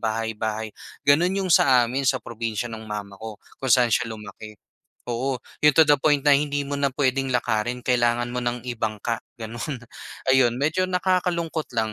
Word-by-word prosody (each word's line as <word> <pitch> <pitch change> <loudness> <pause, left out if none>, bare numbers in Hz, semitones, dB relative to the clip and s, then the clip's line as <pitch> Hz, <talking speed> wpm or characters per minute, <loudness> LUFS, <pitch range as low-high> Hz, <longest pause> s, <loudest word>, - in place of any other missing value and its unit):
bahay-bahay. 110 -1 -3 0.3
Gano'n 175 +7 +3
'yong 180 - +1
sa 125 -5 +5
amin 130 +3 -1
sa 130 - +3
probinsiya 115 -1 -4
no'ng 110 -1 -8
mama 100 -1 -6
ko, 110 -1 -7 0.2
kung 130 - -3
saan 120 -2 +4
siya 115 - +1
lumaki. 110 0 -9 0.5
Oo, 130 +3 -1 0.3
'yong 150 -2 +6
to 160 - +9
the 145 -1 +5
point 145 -2 +3
na 145 - +7
hindi 145 0 0
mo 145 - -6
na 140 0 +2
puwedeng, 135 -1 +1
lakarin 120 +1 -1
kailangan 120 -1 +1
mo 125 - -2
nang 120 -1 -2
ibangka 110 -1 -2 0.2
gano'n. 120 +3 -6 0.5
Ayun 125 -2 +4
medyo 160 +7 0
nakakalungkot 180 -3 0
lang. 110 -1 0
125 Hz, 170 wpm, -24 LUFS, 110-145 Hz, 0.5 s, to